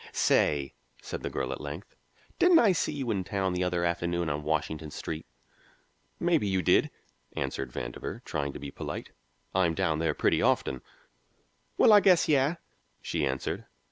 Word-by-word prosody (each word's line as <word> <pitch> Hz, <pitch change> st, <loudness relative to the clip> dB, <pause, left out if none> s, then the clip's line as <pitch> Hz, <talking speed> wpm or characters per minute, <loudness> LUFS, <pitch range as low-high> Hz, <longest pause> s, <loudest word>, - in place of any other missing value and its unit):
"Say," 70 Hz, -2 st, +2 dB, 0.3 s
said -, -, -5 dB
the -, -, -3 dB
girl -, -, -3 dB
at -, -, -5 dB
length, 75 Hz, +6 st, -8 dB, 0.4 s
"didn't 355 Hz, -1 st, +6 dB
I 225 Hz, -8 st, +6 dB
see 180 Hz, -, 0 dB
you 135 Hz, -5 st, -3 dB
in 95 Hz, -3 st, -1 dB
town 95 Hz, -1 st, -1 dB
the 90 Hz, 0 st, 0 dB
other 90 Hz, -1 st, 0 dB
afternoon 85 Hz, -1 st, -1 dB
on 75 Hz, +1 st, -2 dB
Washington 80 Hz, 0 st, -2 dB
Street?" 80 Hz, +1 st, -6 dB, 0.9 s
"Maybe 170 Hz, -10 st, +2 dB
you 95 Hz, -1 st, 0 dB
did," -, -, +4 dB, 0.4 s
answered 65 Hz, -2 st, -3 dB
Vandover, -, -, -6 dB
trying 70 Hz, -1 st, -3 dB
to -, -, -7 dB
be 70 Hz, 0 st, -7 dB
polite. -, -, -6 dB, 0.4 s
"I'm 90 Hz, -3 st, +2 dB
down 80 Hz, -1 st, 0 dB
there 80 Hz, -, 0 dB
pretty -, -, +2 dB
often." 65 Hz, -, +1 dB, 1.0 s
"Well, 220 Hz, -, +7 dB
I 205 Hz, -, +9 dB
guess 185 Hz, -4 st, +4 dB
yes," 145 Hz, +2 st, +2 dB, 0.5 s
she 70 Hz, -, -1 dB
answered. 65 Hz, 0 st, -3 dB
85 Hz, 165 wpm, -29 LUFS, -, 1.0 s, I